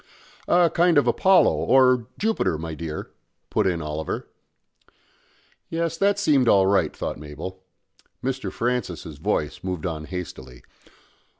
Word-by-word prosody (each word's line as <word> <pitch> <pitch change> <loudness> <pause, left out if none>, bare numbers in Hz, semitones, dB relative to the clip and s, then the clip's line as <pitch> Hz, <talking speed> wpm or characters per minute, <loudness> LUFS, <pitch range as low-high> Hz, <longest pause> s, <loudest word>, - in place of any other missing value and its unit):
"A 175 -2 +4
kind 175 -2 +4
of 145 - +5
Apollo 190 -1 +4
or 125 -3 +3
Jupiter, 220 - 0
my 80 +1 -5
dear," 80 -1 -6 0.4
put - - +2
in 85 -3 -1
Oliver. 75 +1 -4 1.4
Yes 165 0 -1
that 200 +3 +2
seemed 145 -11 +3
all 100 -3 +5
right, 95 -5 +2
thought - - -4
Mabel. 75 +5 -8 0.6
Mr. 130 0 -2
Francis's 100 - -3
voice - - -2
moved 90 -4 -4
on 80 -3 -4
hastily. 65 -9 -8
95 Hz, 125 wpm, -24 LUFS, -, 1.4 s, of